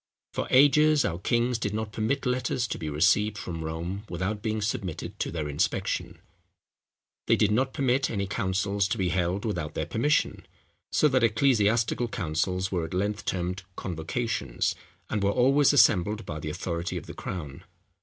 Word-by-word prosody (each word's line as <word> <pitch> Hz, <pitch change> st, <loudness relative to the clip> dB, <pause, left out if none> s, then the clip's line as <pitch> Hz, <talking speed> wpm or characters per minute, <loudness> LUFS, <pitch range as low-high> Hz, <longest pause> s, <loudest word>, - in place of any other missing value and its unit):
For -, -, -2 dB
ages 145 Hz, +2 st, +5 dB
our 85 Hz, 0 st, -2 dB
kings 120 Hz, +4 st, +1 dB
did 105 Hz, -1 st, -2 dB
not 110 Hz, -1 st, -3 dB
permit 120 Hz, +7 st, -1 dB
letters 125 Hz, -1 st, 0 dB
to -, -, -4 dB
be 80 Hz, -3 st, -4 dB
received 100 Hz, +8 st, +2 dB
from 85 Hz, -4 st, -5 dB
Rome 85 Hz, +5 st, -4 dB
without 95 Hz, +4 st, -3 dB
being 110 Hz, 0 st, -1 dB
submitted 100 Hz, -5 st, -4 dB
to -, -, -1 dB
their 80 Hz, -3 st, -3 dB
inspection: 75 Hz, 0 st, -1 dB, 1.1 s
they -, -, +5 dB
did 105 Hz, -, +2 dB
not 130 Hz, +5 st, +1 dB
permit 135 Hz, 0 st, +1 dB
any 100 Hz, -3 st, -1 dB
councils 100 Hz, +1 st, 0 dB
to 90 Hz, -, -2 dB
be 95 Hz, -2 st, 0 dB
held 90 Hz, +3 st, -1 dB
without 85 Hz, -8 st, -3 dB
their 80 Hz, -, -1 dB
permission; 115 Hz, -, 0 dB, 0.4 s
so 150 Hz, -, +4 dB
that 130 Hz, -3 st, +2 dB
ecclesiastical 115 Hz, 0 st, +2 dB
councils 90 Hz, 0 st, -1 dB
were 85 Hz, -4 st, -1 dB
at 85 Hz, +3 st, -6 dB
length 105 Hz, +3 st, -1 dB
termed 90 Hz, +1 st, -2 dB
convocations, 85 Hz, -, -2 dB, 0.3 s
and 105 Hz, -, -2 dB
were 100 Hz, -, +2 dB
always 135 Hz, +6 st, +4 dB
assembled 105 Hz, -5 st, +4 dB
by 75 Hz, -1 st, -5 dB
the 75 Hz, -, -4 dB
authority 85 Hz, +2 st, -3 dB
of -, -, -6 dB
the -, -, -8 dB
crown. 80 Hz, -2 st, -6 dB
100 Hz, 165 wpm, -27 LUFS, 85-115 Hz, 1.1 s, ages